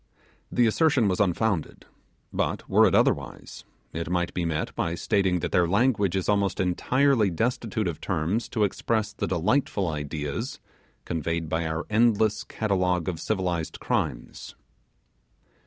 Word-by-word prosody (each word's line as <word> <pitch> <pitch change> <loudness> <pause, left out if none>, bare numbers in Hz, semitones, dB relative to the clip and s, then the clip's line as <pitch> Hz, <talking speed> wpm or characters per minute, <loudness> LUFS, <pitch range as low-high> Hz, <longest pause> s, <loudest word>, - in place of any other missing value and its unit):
The 120 - +3
assertion 130 0 +3
was 90 -2 0
unfounded; 100 -2 0 0.5
but - - -2
were - - +5
it - - +2
otherwise, 65 -4 0 0.3
it 80 0 -4
might 90 -1 -1
be 90 - -1
met 80 -2 -2
by 85 0 -1
stating 90 -1 +1
that - - -3
their 90 -1 +3
language 100 -1 +2
is 95 - -1
almost 100 -1 +1
entirely 115 +5 +2
destitute 110 +2 -1
of 80 -3 -4
terms 90 +6 -1
to 110 - 0
express 105 +1 -1
the - - -3
delightful 95 - +1
ideas 75 -1 -4 0.5
conveyed 85 0 -2
by 80 +1 -1
our 80 +1 -3
endless 110 -1 +2
catalogue 90 -5 0
of 85 -4 -2
civilized 90 -6 -2
crimes. - - -3
95 Hz, 140 wpm, -26 LUFS, 85-110 Hz, 0.5 s, were